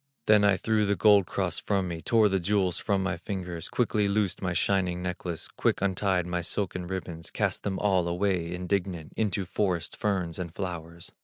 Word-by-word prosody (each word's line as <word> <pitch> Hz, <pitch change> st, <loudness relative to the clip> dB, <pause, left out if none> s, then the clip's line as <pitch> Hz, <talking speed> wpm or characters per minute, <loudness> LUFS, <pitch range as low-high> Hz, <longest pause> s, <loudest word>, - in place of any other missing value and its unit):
Then 105 Hz, -1 st, +5 dB
I 100 Hz, -2 st, +4 dB
threw 110 Hz, -1 st, +1 dB
the 100 Hz, -, +2 dB
gold 100 Hz, -3 st, +5 dB
cross 90 Hz, -4 st, -1 dB
from 100 Hz, -3 st, 0 dB
me, 85 Hz, -2 st, -5 dB
Tore 115 Hz, 0 st, +4 dB
the 95 Hz, -1 st, +1 dB
jewels 95 Hz, -1 st, +1 dB
from 100 Hz, -2 st, 0 dB
my 95 Hz, -2 st, -1 dB
fingers, 90 Hz, -2 st, -5 dB
Quickly 105 Hz, -4 st, +1 dB
loosed 100 Hz, -1 st, 0 dB
my 90 Hz, -2 st, -1 dB
shining 90 Hz, 0 st, +1 dB
necklace, 90 Hz, -2 st, -4 dB
Quick -, -, 0 dB
untied 95 Hz, -2 st, +1 dB
my 90 Hz, 0 st, -2 dB
silken 90 Hz, 0 st, -2 dB
ribbons, 85 Hz, -3 st, -5 dB
Cast -, -, -1 dB
them 95 Hz, -2 st, -2 dB
all 95 Hz, -4 st, +2 dB
away 90 Hz, -1 st, 0 dB
indignant, 90 Hz, -2 st, -2 dB
Into 100 Hz, -3 st, 0 dB
forest 90 Hz, -2 st, -1 dB
ferns 95 Hz, -6 st, -1 dB
and 85 Hz, -2 st, -5 dB
flowers. 85 Hz, -3 st, -6 dB
95 Hz, 180 wpm, -28 LUFS, 85-100 Hz, -, Then